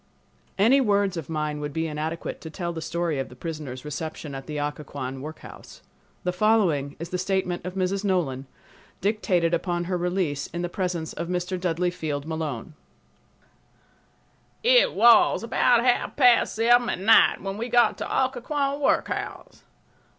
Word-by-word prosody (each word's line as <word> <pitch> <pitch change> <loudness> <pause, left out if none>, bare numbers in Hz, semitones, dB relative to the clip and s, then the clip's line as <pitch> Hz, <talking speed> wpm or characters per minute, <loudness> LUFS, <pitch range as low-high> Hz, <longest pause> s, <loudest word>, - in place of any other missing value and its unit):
Any 240 +8 +5
words 200 -4 +1
of 165 -3 -6
mine 150 -2 -2
would 145 -1 -5
be 160 +1 -1
inadequate 155 +1 -4
to 160 - -8
tell 170 +1 -4
the 165 - -5
story 170 -3 -2
of 135 - -4
the 125 - -13
prisoners' 150 -3 -6
reception 150 0 -6
at 135 0 -7
the 150 - -5
Occoquan 145 -3 -5
workhouse. 155 +2 -11 0.4
The 180 - -1
following 180 -9 +2
is 170 +1 -7
the 180 - -3
statement 185 -1 -1
of 180 - -6
Mrs. 190 +1 -1
Nolan, 150 -9 -1 0.5
dictated 185 -4 +1
upon 175 0 -1
her 180 +1 -2
release, 175 -5 -1
in 175 0 -5
the 175 - -2
presence 175 -4 -3
of 170 - -5
Mr. 180 +1 -2
Dudley 180 0 0
Field 150 -5 -4
Malone: 160 -3 -4 1.9
It - - +5
was 230 +1 +5
about 235 +1 +3
half 245 -1 +1
past 250 -4 +4
seven 240 +2 +4
at - - -1
night 200 +4 +5
when 195 0 -5
we 235 +2 -3
got 240 0 +4
to - - -3 0.2
Occoquan 275 +2 -2
workhouse. 275 - -2
175 Hz, 160 wpm, -25 LUFS, 155-205 Hz, 1.9 s, Any